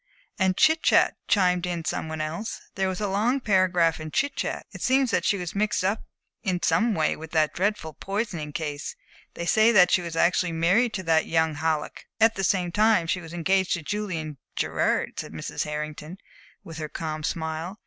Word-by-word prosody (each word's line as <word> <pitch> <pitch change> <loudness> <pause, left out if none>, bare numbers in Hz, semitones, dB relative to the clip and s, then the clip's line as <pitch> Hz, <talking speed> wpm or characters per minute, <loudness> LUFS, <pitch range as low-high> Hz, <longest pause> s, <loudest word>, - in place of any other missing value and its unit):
"And 190 -1 +2
Chit 315 +1 +4
Chat," - - +4
chimed 180 -3 +2
in 170 -2 -3
some 160 - -2
one 160 0 -4
else. 165 +8 -4
"There 190 -1 0
was 185 - -4
a 210 - -1
long 220 +7 +1
paragraph 185 -7 +2
in 155 0 -6
Chit 275 - 0
Chat. - - -3
It - - -10
seems 260 -1 +2
that - - +1
she 200 - +2
was 175 -2 -5
mixed 210 -1 0
up 200 +3 -1 0.4
in 185 -5 -1
some 225 -1 +2
way 155 -1 +2
in 160 - -8
that 155 -2 +2
dreadful 185 -4 -1
poisoning 195 -5 -4
case. 145 -1 -4 0.4
They 170 - -4
say 220 +5 +4
that 180 -4 +6
she 180 - +4
was 170 -2 -6
actually 170 +1 +2
married 190 +9 +2
to 190 - -4
that 160 -2 +2
young 160 -1 +2
Halleck." 155 0 -2
"At 225 0 +5
the 195 - -4
same 180 -2 +1
time 215 -1 +3
that 165 - -8
she 180 - -1
was 165 -1 -10
engaged 185 +2 +1
to 170 - -3
Julian 165 -7 -4 0.2
Gerard," - - 0
said - - -6
Mrs. - - -4
Hartington, 150 +3 -5 0.5
with 165 -1 -9
her 155 -1 -4
calm 155 -1 -4
smile. 160 +4 -3
180 Hz, 200 wpm, -25 LUFS, 160-205 Hz, 0.5 s, that